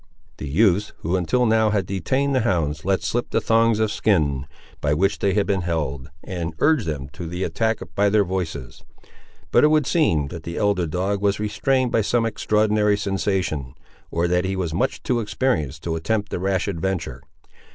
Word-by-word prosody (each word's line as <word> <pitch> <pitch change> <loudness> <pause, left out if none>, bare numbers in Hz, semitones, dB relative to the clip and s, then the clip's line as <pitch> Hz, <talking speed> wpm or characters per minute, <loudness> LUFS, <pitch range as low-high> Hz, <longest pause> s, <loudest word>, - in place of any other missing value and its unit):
The - - -6
youths 100 +5 +2
who, 85 +4 -1
until 95 +8 +1
now, 110 -1 +3
had 100 -3 0
detained 130 +10 0
the 130 - +3
hounds, 80 -9 0
let 95 +1 0
slip 120 +1 -1
the - - +1
thongs 115 0 +3
of 110 -1 +1
skin, 75 -12 +1 0.3
by 75 0 +1
which 95 +5 +1
they 100 -1 +1
had 105 - +2
been 95 -1 0
held, 75 -5 -3
and 85 -3 -4
urged 150 - +2
them 70 -4 -3
to 85 +3 -7
the 90 +3 -3
attack 110 -1 0 0.2
by 100 0 +3
their 105 0 +3
voices. 85 -9 -5 0.7
But, - - +5
it - - +7
would 155 -2 +3
seem, 80 - +2
that 85 - -7
the 85 +1 -6
elder 100 -5 +1
dog 95 +5 -1
was 100 -1 +1
restrained 120 +5 0
by 115 - +3
some 115 +3 +1
extraordinary 105 -1 +2
sensation, 95 -9 -2 0.3
or 85 +1 0
that 90 +1 +1
he 95 +1 -2
was 90 -4 -2
much 125 +11 -1
too 125 -2 0
experienced 105 - -1
to 80 -1 -2
attempt 105 +5 -1
the - - -2
rash 95 +1 0
adventure. 85 -9 -3
95 Hz, 190 wpm, -22 LUFS, 85-110 Hz, 0.7 s, it